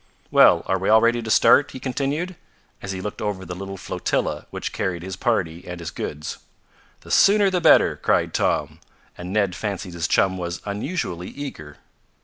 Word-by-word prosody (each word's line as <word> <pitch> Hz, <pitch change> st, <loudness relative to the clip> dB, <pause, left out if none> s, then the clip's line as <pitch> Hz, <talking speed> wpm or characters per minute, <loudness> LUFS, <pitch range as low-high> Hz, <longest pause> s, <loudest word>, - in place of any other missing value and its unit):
"Well, -, -, +6 dB
are 95 Hz, -, 0 dB
we 95 Hz, -, -1 dB
all 110 Hz, +1 st, +7 dB
ready 120 Hz, +1 st, +2 dB
to 110 Hz, -, -6 dB
start?" 140 Hz, +5 st, +5 dB
he -, -, -9 dB
continued, 140 Hz, +8 st, -2 dB, 0.5 s
as 95 Hz, -, -5 dB
he 95 Hz, -, -4 dB
looked 105 Hz, +1 st, -6 dB
over 100 Hz, -3 st, -3 dB
the 90 Hz, -, -6 dB
little 95 Hz, +2 st, -7 dB
flotilla -, -, -2 dB
which -, -, -5 dB
carried 85 Hz, -2 st, -2 dB
his 95 Hz, 0 st, -5 dB
party 95 Hz, -6 st, -1 dB
and 90 Hz, 0 st, -6 dB
his 85 Hz, -, -6 dB
goods. 75 Hz, +1 st, -6 dB, 0.6 s
"The -, -, -11 dB
sooner 200 Hz, -1 st, +5 dB
the 180 Hz, -1 st, 0 dB
better!" -, -, +5 dB
cried -, -, +1 dB
Tom, -, -, 0 dB, 0.4 s
and 90 Hz, +1 st, -7 dB
Ned 100 Hz, -3 st, +1 dB
fancied 100 Hz, -3 st, -4 dB
his 85 Hz, 0 st, -2 dB
chum 95 Hz, -1 st, +2 dB
was 85 Hz, 0 st, -4 dB
unusually 100 Hz, -, -3 dB
eager. 75 Hz, -, -8 dB
95 Hz, 180 wpm, -23 LUFS, 90-120 Hz, 0.6 s, all